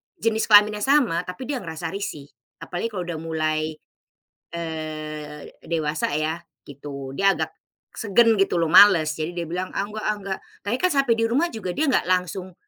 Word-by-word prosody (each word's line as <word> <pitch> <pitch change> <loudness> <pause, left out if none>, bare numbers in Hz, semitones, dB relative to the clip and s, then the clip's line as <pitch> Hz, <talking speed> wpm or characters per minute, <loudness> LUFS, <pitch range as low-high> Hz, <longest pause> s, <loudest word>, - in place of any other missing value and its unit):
jenis 225 -9 0
kelaminnya 210 0 +6
sama, 240 - +2
tapi 180 +7 -6
dia 280 -3 -1
ngerasa 165 -3 -5
risih, 155 -8 -6 0.3
apalagi 180 +5 -3
kalau 185 -3 -3
udah 170 -2 -5
mulai, 155 -1 -2 0.8
eee, 155 -2 -6
dewasa 155 -3 -1
ya, 160 +2 -2 0.3
gitu. 140 -1 -8
Dia 195 +4 +3
agak - - -3 0.4
segan 225 +2 +4
gitu 195 -2 +2
loh, 165 - +2
males, 180 -4 +7
jadi 160 +3 -3
dia 170 -1 -3
bilang 180 +2 -3
"ah - - 0
nggak 215 +1 -7
ah 215 - +1
nggak" 190 0 -4 0.2
tapi 220 +5 -1
kan 365 - +2
sampai 275 -4 +3
di 230 - +2
rumah 280 +10 +1
juga 185 -6 -5
dia 305 -1 +1
nggak 255 - +1
langsung 185 0 -1
180 Hz, 175 wpm, -23 LUFS, 155-210 Hz, 0.8 s, males